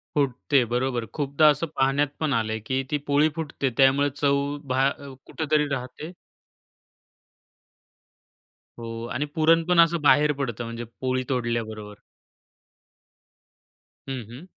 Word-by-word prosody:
फुटते, 140 -1 +2
बरोबर. 125 -1 -1
खूपदा 145 +1 +2
असं 150 +3 +1
पाहण्यात 135 +2 +2
पण 155 -3 0
आलंय, 110 -2 -1
की 130 +2 0
ती 150 - +2
पोळी 145 +2 +3
फुटते 150 -4 -2
त्यामुळे 135 +2 +4
चव 140 0 0
बाहे 135 +1 -1
कुठेतरी 155 -1 0
राहते. 130 +5 -7 2.7
हो 115 0 -6
आणि 140 +4 -1
पुरण 165 +1 +4
पण 180 - +4
असं 170 0 +4
बाहेर 150 0 +5
पडतं 120 -5 -4
म्हणजे 115 +1 -6 0.2
पोळी 130 0 0
तोडल्याबरोबर. 110 -4 -3 2.1
हं, 130 -2 -4
हं. 130 +8 -10
135 Hz, 115 wpm, -25 LUFS, 125-150 Hz, 2.7 s, बाहेर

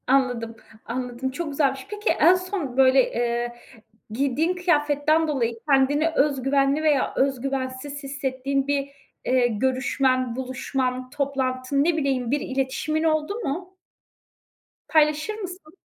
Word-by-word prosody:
Anladım, 245 -4 +1 0.3
anladım 250 +2 -4
çok 330 +3 -4
güzelmiş. 275 -2 0
Peki 420 +1 -2
en 355 - +5
son 365 -8 -4
böyle, 265 0 +5
eee, 240 0 -1 0.6
giydiğin 280 +9 0
kıyafetten 310 -2 +2
dolayı 240 -6 0
kendini 285 +3 +3
öz 285 -3 +1
güvenli 275 +2 +2
veya 295 -4 +2
öz 270 -2 +1
güvensiz 270 +2 -4
hissettiğin 275 0 -2
bir, 280 -1 0 0.4
eee, 255 -1 +3
görüşmen, 255 +1 0
buluşman, 255 0 -3
toplantın 270 -1 -1
ne 330 +1 +1
bileyim 265 -5 0
bir 290 - +2
iletişimin 270 +4 -1
oldu 310 +4 +1
mu? 370 +1 -4 1.1
Paylaşır 305 +4 +2
mısın? 370 -6 -8
275 Hz, 120 wpm, -24 LUFS, 260-305 Hz, 1.1 s, en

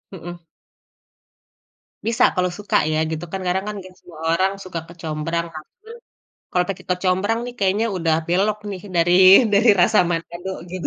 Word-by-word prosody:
Mhm. 175 0 -9 1.7
Bisa 230 -1 +2
kalau 180 0 0
suka 205 0 -1 0.2
ya 155 - 0
gitu 160 +2 -4
kan. 195 - -3
Karena 185 +2 +1
kan 210 - -5 0.2
semua 165 -3 -14
orang 190 +3 +1
suka 175 -2 -5
kecombrang. 165 0 -4
Tapi, 360 - -13 0.6
kalau 180 0 +1
pakai 195 - -5
kecombrang 190 +4 0
nih 245 - -7
kayaknya 200 +3 +1
udah 165 -2 +1
belok 200 +5 +1
nih 190 - -6 0.2
dari 170 +1 +3 0.4
dari 215 +4 +4
rasa 210 +4 +4
Manado 170 +2 -4 0.2
gitu. 185 -1 -4
180 Hz, 150 wpm, -21 LUFS, 170-200 Hz, 1.7 s, dari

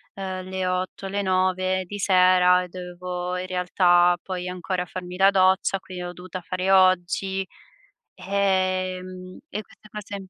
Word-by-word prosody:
ehm, 185 -1 -5
le 190 -1 -2
8, 185 +1 -3
le 200 +1 -2
9 185 0 +1
di 205 +3 -7
sera 180 -1 +4
e - - -8
dovevo, 180 0 -5
in 180 0 -4
realtà, 180 -1 +3
poi 180 -1 -5
ancora 180 0 -3
farmi 180 +1 -7
la 195 +1 +5
doccia, 190 0 +3
quindi 185 -1 -10
l'ho 175 0 -5
dovuta 180 +1 -8
fare 185 +2 -3
oggi, 190 0 +3 0.7
ehm, 185 -1 -2
e 210 - -4
queste 210 - -20
cose 205 -1 -7
185 Hz, 145 wpm, -24 LUFS, 180-190 Hz, 0.7 s, la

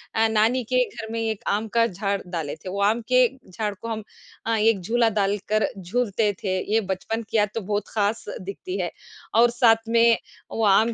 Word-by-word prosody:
अ, 225 0 +4
नानी 225 +4 +3
के 250 0 +5
घर 220 0 -8
में 230 - -2
एक 220 -2 -2
आम 215 +2 0
का 230 - +6
झाड़ 200 +1 -2
डाले 165 -5 -4
थे, 185 - -9
वो 200 +2 -3
आम 220 +3 +2
के 250 -1 +6 0.2
झाड़ 210 +2 -3
को 230 +4 -9
हम 220 -2 -3 0.4
अ, 225 0 +1
एक 215 -1 +3
झूला 230 +4 +2
डालकर 205 +1 +1
झूलते 210 +2 0
थे, 185 -1 0
ये 225 - +4
बचपन 225 +4 -4
की 225 - 0
याद 210 -1 +3
तो 225 - -1
बहुत 205 0 0
ख़ास 210 +1 -1 0.2
दिखती 200 - -5
है। - - -2 0.4
और 235 +1 +6
साथ 225 -2 +3
में 230 0 +5 0.3
वो 225 - -1
आम 220 +4 +4
220 Hz, 205 wpm, -24 LUFS, 200-230 Hz, 0.4 s, का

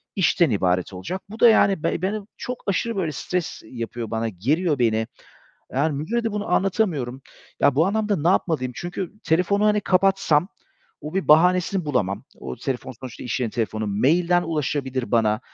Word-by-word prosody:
işten 170 -4 +3
ibaret 90 -2 0
olacak." 175 - -5
Bu 220 - -9
da 240 - +8
yani 195 -6 +3
be - - 0
beni 205 +3 -1 0.2
çok 250 0 -6
aşırı 230 +3 0
böyle 170 -5 -1
stres 175 +4 -3
yapıyor 115 -1 -6
bana, 115 0 -1
geriyor 145 - 0
beni. 110 -1 +1 0.7
Yani 140 +2 +1
müdüre 230 +11 -2
de 225 - -1
bunu 210 -1 -3
anlatamıyorum. 175 - 0 0.4
Ya, 140 -2 +4
bu 160 +5 +3
anlamda 210 0 0
ne 165 +3 0
yapmalıyım? 150 -9 +1
Çünkü 175 +2 -5
telefonu, 180 +5 +2
hani, 210 0 +3
kapatsam 185 -4 +2 0.5
o 150 +4 -7
bir 195 - -1
bahanesini 180 +3 +4
bulamam. 105 -10 -1 0.2
O 65 - -6
telefon 130 0 -4
sonuçta 125 -3 -8
iş 125 - -2
yerinin 115 - -1
telefonu. 110 -2 -2
Mail'den 170 - +2
ulaşabilir 140 -5 -2
bana, 110 -1 +2
155 Hz, 165 wpm, -23 LUFS, 120-190 Hz, 0.7 s, da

